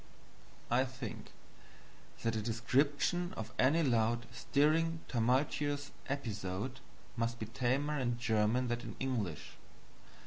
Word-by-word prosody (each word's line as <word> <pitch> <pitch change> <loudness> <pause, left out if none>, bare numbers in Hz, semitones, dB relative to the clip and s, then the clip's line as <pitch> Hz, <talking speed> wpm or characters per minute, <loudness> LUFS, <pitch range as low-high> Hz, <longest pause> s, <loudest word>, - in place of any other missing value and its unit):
I 125 +2 +5
think 130 -4 -7 0.9
that 115 0 +1
a 110 - 0
description 140 - +1
of 110 0 -5
any 150 +6 +5
loud, 120 -2 +2
stirring, 160 +6 +2
tumultuous 140 +4 +1 0.2
episode 110 -2 -3 0.4
must 115 0 -1
be 110 - -4
tamer 130 +6 0
in 120 -2 0
German 115 +1 +2
than 120 0 0
in - - -7
English. 110 - -3
125 Hz, 110 wpm, -34 LUFS, 115-140 Hz, 0.9 s, I